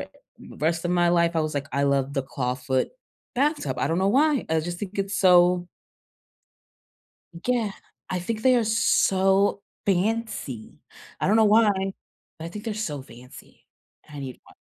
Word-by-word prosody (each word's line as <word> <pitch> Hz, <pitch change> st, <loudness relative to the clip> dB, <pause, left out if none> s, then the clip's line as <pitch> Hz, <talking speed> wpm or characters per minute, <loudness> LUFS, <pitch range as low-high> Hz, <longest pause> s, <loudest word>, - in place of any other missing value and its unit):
r -, -, -6 dB, 0.5 s
rest 165 Hz, +2 st, 0 dB
of 175 Hz, -, 0 dB
my 175 Hz, -1 st, +3 dB
life, 170 Hz, -1 st, +2 dB
I 160 Hz, -, +3 dB
was 155 Hz, -1 st, -2 dB
like, 140 Hz, 0 st, -2 dB
"I 140 Hz, +2 st, 0 dB
love 140 Hz, 0 st, +1 dB
the 135 Hz, -, 0 dB
clawfoot 130 Hz, 0 st, -2 dB, 0.5 s
bathtub." 255 Hz, -, 0 dB
I -, -, +1 dB
don't 165 Hz, +2 st, 0 dB
know 190 Hz, -, +2 dB
why. 285 Hz, +4 st, +2 dB
I 160 Hz, 0 st, +1 dB
just 175 Hz, +2 st, -5 dB
think 205 Hz, 0 st, -6 dB
it's 195 Hz, +1 st, -1 dB
so 180 Hz, -1 st, +4 dB, 1.8 s
Yeah. 235 Hz, -5 st, 0 dB, 0.4 s
I 185 Hz, -, -1 dB
think 220 Hz, +4 st, -4 dB
they 255 Hz, -1 st, +5 dB
are 235 Hz, -, +2 dB
so 200 Hz, -3 st, +2 dB, 0.2 s
fancy. 195 Hz, -, -2 dB, 0.4 s
I -, -, 0 dB
don't 210 Hz, -, +4 dB
know 220 Hz, -, +5 dB
why, 215 Hz, +1 st, +5 dB, 0.7 s
but 160 Hz, -, -8 dB
I 165 Hz, -, -4 dB
think 210 Hz, +5 st, -9 dB
they're 225 Hz, -, -2 dB
so 155 Hz, -10 st, -4 dB
fancy. 125 Hz, -1 st, -15 dB, 0.4 s
And 150 Hz, -, -12 dB
I 140 Hz, -, -6 dB
need 130 Hz, -2 st, -7 dB
one. -, -, -19 dB
180 Hz, 175 wpm, -25 LUFS, 145-215 Hz, 1.8 s, they